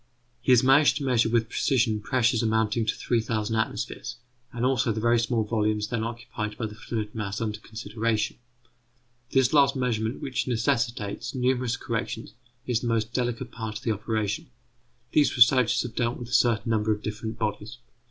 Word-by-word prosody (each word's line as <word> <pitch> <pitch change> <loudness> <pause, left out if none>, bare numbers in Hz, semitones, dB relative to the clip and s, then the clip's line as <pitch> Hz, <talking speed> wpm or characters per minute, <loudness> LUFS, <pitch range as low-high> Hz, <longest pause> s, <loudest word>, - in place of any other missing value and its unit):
He 130 - +2
has 125 -1 +6
managed 135 +3 +5
to 145 - -4
measure 120 -4 +2
with 115 -1 +2
precision 115 -4 +1
pressures 120 0 +2
amounting 110 0 +1
to - - +1
3000 115 -2 -1
atmospheres, 110 - -3 0.4
and 120 0 -2
also 125 -3 +2
the 110 - -2
very 120 +1 +3
small 115 -1 +1
volumes 105 -1 0
then 115 -3 -1
occupied 115 -2 -5
by 115 - -2
the 105 - -6
fluid 110 -1 -5
mass 105 -2 -3
under 105 -2 -3
consideration. 110 0 -2 0.9
This 130 0 +3
last 140 -2 +5
measurement, 115 -2 -1
which 135 -1 -2
necessitates 115 -3 -1
numerous 125 -1 +1
corrections, 115 -1 -4 0.3
is 120 -3 +1
the 120 - -4
most 115 -1 0
delicate 120 0 -2
part 110 -2 -5
of 120 - -12
the 115 - +1
operation. 110 +6 -2 0.6
These 145 -3 +3
researches 120 0 +5
have 120 -2 -6
dealt 120 +1 -1
with 120 -1 -8
a - - -7
certain 115 -2 +3
number 110 -1 +1
of 105 0 -2
different 110 +1 -4
bodies. 110 +1 -3
115 Hz, 170 wpm, -26 LUFS, 110-125 Hz, 0.9 s, has